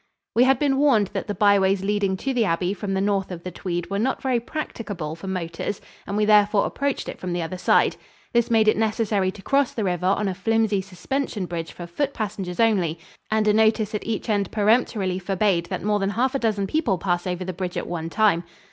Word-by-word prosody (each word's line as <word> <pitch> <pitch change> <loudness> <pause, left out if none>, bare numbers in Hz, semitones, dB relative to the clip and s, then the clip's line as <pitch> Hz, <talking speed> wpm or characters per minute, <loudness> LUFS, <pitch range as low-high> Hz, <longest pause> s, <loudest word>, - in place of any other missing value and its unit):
We 240 +2 +5
had 265 0 +4
been 275 -1 +1
warned 235 -9 +3
that - - -3
the 205 - -3
byways 195 -2 +3
leading 200 -1 0
to 270 +7 -2
the 240 -2 +2
abbey 180 0 0
from 195 0 -3
the 190 - +1
north 200 -1 0
of 175 -2 -7
the 180 - -5
Tweed 175 0 -4
were 200 - 0
not 260 +5 0
very 255 -3 +1
practicable 205 - -5
for 165 +4 -9
motors 180 +1 -3 0.3
and 200 - -2
we 210 - +3
therefore 210 -1 +4
approached 280 0 -2
it - - -6
from 180 -1 -4
the 175 -1 -1
other 180 +3 -5
side. - - +3 0.4
This 235 -1 +2
made 220 -2 +3
it 215 - +4
necessary 215 -3 +1
to 195 +1 -9
cross 275 -1 +2
the 220 - -1
river 180 -1 0
on 200 +2 +2
a 190 - -1
flimsy 215 +1 +1
suspension 200 +3 -3
bridge 170 -2 -5
for 175 - -8
foot 280 +12 -2
passengers 195 -4 -4
only, 190 -8 +2 0.3
and 215 0 +1
a 210 - +5
notice 220 0 +2
at 210 - -2
each 220 -2 -3
end 205 -4 +1
peremptorily 210 -3 +1
forbade 190 -2 0
that 185 - -4
more 210 0 +1
than 195 0 0
half 250 +6 0
a 275 - 0
dozen 215 -4 0
people 220 - 0
pass 175 0 -1
over 180 0 -3
the 185 - -4
bridge 180 0 -4
at - - -2
one 165 -1 -4
time. 205 -4 +2
200 Hz, 230 wpm, -24 LUFS, 185-220 Hz, 0.4 s, We